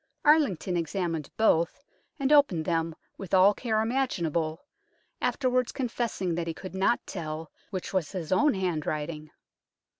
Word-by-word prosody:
Arlington 275 - +3
examined 165 -2 -2
both 170 -6 +2 0.4
and 275 +1 +1
opened 200 - +4
them 165 -2 0 0.2
with 195 -1 -1
all 190 +2 +7
care 220 -1 0
imaginable, 170 - -1 0.6
afterwards 255 -2 +1
confessing 235 -8 -2
that 170 0 -2
he 165 - -3
could 185 +2 -8
not 190 +5 +1
tell 160 -3 -5 0.2
which 185 -1 -5
was 175 -6 0
his 170 -5 -5
own 285 +7 +4
handwriting. 155 -3 -2
185 Hz, 130 wpm, -28 LUFS, 165-230 Hz, 0.6 s, all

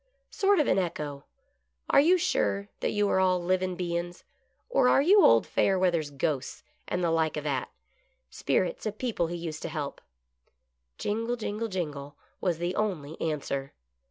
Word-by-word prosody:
Sort 400 -2 +3
of 300 - +3
an 195 - +3
echo 150 -6 -4 0.3
— 60 0 -44
are - - +7
you 350 +5 +5
sure 205 - 0
that - - 0
you 205 -1 +1
are 190 - +2
all 185 -1 +3
livin' 185 +1 0
bein's, 175 0 -3 0.4
or 265 - +3
are 275 - +5
you 390 +5 +6
old - - +6
Fayerweather's 180 -5 +1
ghosts, 140 -1 -3 0.2
and 180 - -2
the 170 - +2
like 160 -1 +1
o' - - -2
that? 140 -4 -2 0.6
Spirits - - -1
of 215 0 -4
people 225 -9 -1
he 175 +1 -4
used 165 -2 -6
to - - -4
help? 150 -3 -5 0.5
" 60 0 -51
Jingle, 230 +3 -1
jingle, 225 -1 -3
j 190 -4 -2
ingle',' 145 -3 -7 0.3
was 175 -4 0
the 175 +2 -2
only 165 -8 -2
answer. 140 -3 -3
175 Hz, 175 wpm, -28 LUFS, 150-205 Hz, 0.6 s, are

